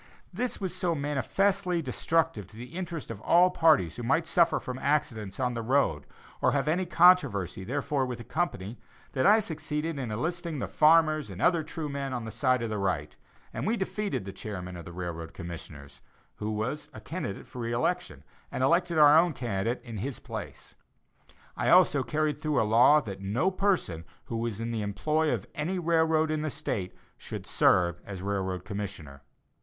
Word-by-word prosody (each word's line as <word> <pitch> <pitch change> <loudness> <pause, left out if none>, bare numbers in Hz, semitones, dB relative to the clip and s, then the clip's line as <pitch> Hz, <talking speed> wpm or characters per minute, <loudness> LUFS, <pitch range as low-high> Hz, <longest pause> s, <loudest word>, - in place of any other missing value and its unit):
This 245 +7 -2
was 185 -3 -3
so 180 -2 0
manifestly 175 - 0
destructive 160 - 0
to 110 - -14
the 125 +7 -9
interests 170 -7 -5
of 105 -2 -8
all 180 +6 +5
parties 160 - +3
who - - -5
might 160 +8 +1
suffer 170 0 +3
from 125 0 -6
accidents 135 -9 -1
on 125 -1 0
the 115 - -3
road, 115 - +1 0.3
or - - +3
have 140 0 0
any 175 +4 +1
controversy 170 - +4
therefor 140 +4 -1
with 125 -2 -3
the 120 - -9
company, 115 - -3 0.3
that 135 +6 +2
I 210 +2 +7
succeeded 160 -4 -3
in 125 -4 -3
enlisting 165 +8 -3
the 125 - -2
farmers 155 -3 +4
and 95 -2 -8
other 170 - +3
true 155 0 -5
men 140 -2 -4
on 120 -2 -3
the 110 - -6
side 130 -2 +1
of 115 - -3
right; 95 -8 -2 0.4
and - - -3
we 230 +2 +1
defeated 200 - -2
the 100 - -5
chairman 90 -3 -6
of 85 - -9
the - - -8
railroad 85 -2 -6
commissioners, 80 -5 -9 0.4
who 105 - -3
was 120 +8 -3
a - - -9
candidate 155 - -5
for 125 - -10
re 115 -1 -2
election, 175 +10 -1 0.3
and 130 - -2
elected 170 +4 +2
our 150 -1 +8
own 170 -1 +2
candidate 115 -2 -2
in 115 -3 -7
his 125 +5 -4
place. - - -8 0.8
I - - 0
also 175 -6 +6
carried 150 +1 -1
through 155 -2 +1
a - - +3
law 120 +8 +6
that 100 -6 -7
no 120 - 0
person 185 - 0 0.2
who 115 - -4
was 115 -2 -3
in 115 +1 -3
the 115 -2 -2
employ 150 +10 0
of - - -2
any 170 +6 -2
railroad 160 -2 +2
in 155 -1 -1
the 155 - -1
State 115 -11 -3 0.2
should - - -7
serve 85 -1 +3
as 95 -2 -7
railroad 95 -2 -2
commissioner. 100 -9 -6
135 Hz, 185 wpm, -28 LUFS, 105-165 Hz, 0.8 s, our